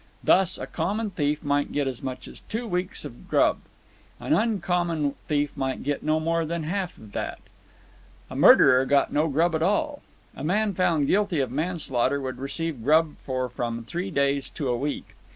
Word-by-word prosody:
Thus, 190 -1 +4
a - - -5
common 205 +6 -2
thief 150 -3 -1
might 145 0 0
get 145 -2 0
as 130 -3 -4
much 130 -1 -6
as - - -10
two 230 +2 -5
weeks' 180 -1 -2 0.2
grub; - - +3 0.6
an - - 0
uncommon 175 -9 +1
thief 145 -1 0
might 135 -2 -2
get 145 0 -1
no 155 +1 +1
more 165 +1 0
than 165 +1 -3
half 180 +3 -3
of 105 -2 -14
that. - - -4 0.9
A - - -9
murderer 130 +1 +7
got 140 -1 +2
no 150 +2 +2
grub 165 +4 +2
at 160 - 0
all. 285 - 0 0.3
A - - -7
man 205 +6 +1
found 170 -5 +2
guilty 195 0 +1
of 130 -3 -1
manslaughter 140 -4 0
would 130 -2 -5
receive 145 0 -3
grub 155 +2 +3
for 130 -1 -2
from 120 -1 -4
three 175 +11 -4
days 140 -3 0
to 140 -5 -4
a 120 - +1
week. 145 +4 -4
155 Hz, 180 wpm, -25 LUFS, 140-180 Hz, 0.9 s, murderer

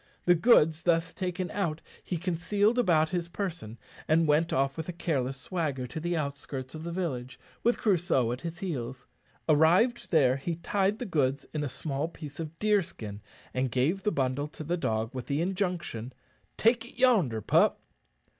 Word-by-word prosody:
The 175 - +7
goods 165 -5 +5
thus 165 -1 +1
taken 180 0 -3
out 170 -6 -1 0.2
he 180 - -3
concealed 200 +7 +1
about 160 -8 +3
his 175 -2 -2
person, 170 - -5 0.3
and 160 +1 +3
went 155 +3 +3
off 135 0 +1
with 160 +1 -5
a - - -3
careless 135 -6 -1
swagger 140 -3 -2
to 125 +6 -6
the 170 +1 -1
outskirts 140 -3 -4
of 155 0 -7
the 170 - -4
village, 130 -9 -3 0.2
with 240 - +2
Crusoe 175 - +2
at 125 - -4
his 170 0 -5
heels. 130 - -4 0.4
Arrived 170 +11 +4
there, 135 -6 +4
he 165 +5 -3
tied 195 +4 0
the 245 - -4
goods 140 - 0
in 150 -1 -1
a 145 - -2
small 140 +3 -3
piece 150 -3 -10
of 165 0 -6
deerskin, 165 - -1 0.3
and 130 0 0
gave 135 - +1
the 210 - +1
bundle 135 0 0
to 155 - -9
the 170 +4 -1
dog, 110 -6 -1
with 130 -2 -6
the 140 0 0
injunction, 175 - -2 0.4
"Take 230 +1 +3
it 240 - -11
yonder, 205 - +3
pup." 105 - +3
160 Hz, 175 wpm, -29 LUFS, 135-180 Hz, 0.4 s, The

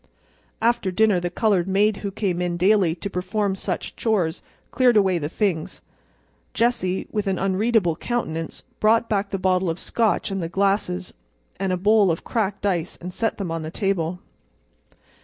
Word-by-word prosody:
After 230 -4 +2
dinner 205 0 +3
the 175 0 -2
colored 190 -1 +1
maid 200 +2 +2
who 200 - -4
came 190 -3 -2
in 175 -1 -1
daily 185 -2 +3
to 190 - -5
perform 195 +2 -1
such - - -4
chores 190 -7 0 0.3
cleared 245 -2 +4
away 190 -4 +3
the 145 -1 -3
things. 180 -4 -1 0.8
Jessie, 225 -6 +1
with 210 -1 -2
an 190 -1 0
unreadable 195 -1 +1
countenance, 165 -10 -3 0.2
brought 225 +2 +3
back 200 -2 0
the 195 - -2
bottle 185 -1 +1
of 165 - -2
Scotch 220 0 0
and 195 -1 -2
the 165 - -3
glasses 195 - 0 0.5
and 195 -1 0
a 185 - +1
bowl 205 +1 +4
of 165 - -1
cracked 205 -3 -2
ice 180 -4 -1
and 180 +1 -7
set 225 +3 -1
them 190 -5 -4
on 165 0 -2
the 155 - -5
table. 180 -2 -1
195 Hz, 170 wpm, -23 LUFS, 175-215 Hz, 0.8 s, cleared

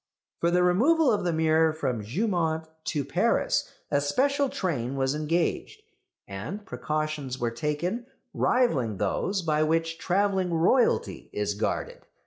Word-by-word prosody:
For 170 - +2
the 180 +1 +3
removal 260 - +4
of 210 - 0
the 175 - +1
mirror 160 0 +3
from 130 -7 -2
Jeumont 160 - -1 0.2
to 145 -4 -1
Paris - - +1 0.2
a 145 -1 +2
special 275 - +1
train 140 - -2
was 135 0 0
engaged, 165 - -1 0.4
and 145 - -6
precautions 155 -6 -3
were 120 -2 -1
taken 150 - -2 0.3
rivalling 135 - +1
those 180 - -1
by 155 -2 +1
which 165 +1 0
travelling 190 -1 +1
Royalty 190 +10 +2
is - - -1
guarded. - - -3
165 Hz, 130 wpm, -27 LUFS, 150-195 Hz, 0.4 s, removal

